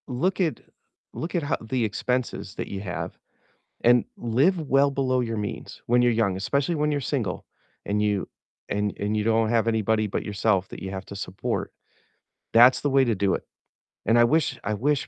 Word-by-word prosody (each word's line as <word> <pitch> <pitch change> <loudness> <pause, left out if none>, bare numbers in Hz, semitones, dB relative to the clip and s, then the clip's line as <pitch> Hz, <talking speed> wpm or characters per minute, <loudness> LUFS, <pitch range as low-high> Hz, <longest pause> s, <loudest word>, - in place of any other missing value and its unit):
Look 170 +10 0
at 165 -4 0 0.5
look 170 +3 -5
at 170 - +1
how 145 - 0
the 120 +2 -1
expenses 115 -2 -2
that - - -4
you 95 -1 -5
have 90 -3 -5 0.7
and 120 0 +5
live 130 +11 +2
well 140 +1 +4
below 130 -2 +1
your 115 -2 -2
means 105 -1 -5
when 120 +1 +4
you're 120 0 +4
young, 110 -4 +1
especially 140 - 0
when 150 0 +1
you're 145 - 0
single 120 -9 -2 0.4
and 105 +1 0
you 105 -2 0 0.4
and 105 0 -1
and 105 +1 -1
you 105 - 0
don't 110 0 +2
have 115 -1 +2
anybody 110 -1 +1
but 100 - -3
yourself 100 -2 0
that - - -9
you 95 - -4
have 95 0 -5
to 100 - -8
support, 95 -1 -3 0.8
that's 120 +3 +7
the 145 - 0
way 135 0 +4
to 120 -3 +1
do 100 -1 +1
it. - - -4 0.6
And 115 +3 +4
I 120 - +7
wish 150 +5 +2
I 105 - -1
wish, 140 +7 0
115 Hz, 195 wpm, -25 LUFS, 105-135 Hz, 0.8 s, that's